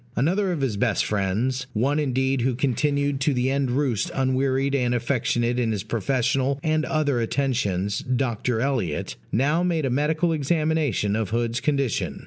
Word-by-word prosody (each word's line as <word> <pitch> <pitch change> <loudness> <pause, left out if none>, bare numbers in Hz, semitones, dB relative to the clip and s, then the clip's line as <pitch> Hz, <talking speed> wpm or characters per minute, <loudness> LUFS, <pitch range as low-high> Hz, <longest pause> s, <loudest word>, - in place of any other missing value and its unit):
Another 185 +7 +1
of 165 -5 -2
his 120 -7 -1
best 115 0 +1
friends 110 +7 -1
one 135 +7 +1
indeed 130 -2 0
who 125 +1 +1
continued 140 +2 0
to 140 0 +1
the 125 +1 +1
end 135 -1 0
roost 125 -4 0
unwearied 135 +1 +1
and 125 -3 +1
affectionate 120 0 0
in 115 -2 +1
his 100 -3 -2
professional 130 +4 0
and 155 0 +1
other 155 -6 0
attentions, 105 -6 -1
Dr. 125 -2 -1
Elliot 115 - -1 0.2
now 145 +8 +2
made 170 -4 0
a 130 - 0
medical 155 +5 +1
examination 155 -7 0
of 110 -3 -1
Hood's 115 +1 -1
condition. 140 -3 -1
130 Hz, 155 wpm, -24 LUFS, 120-145 Hz, 0.2 s, now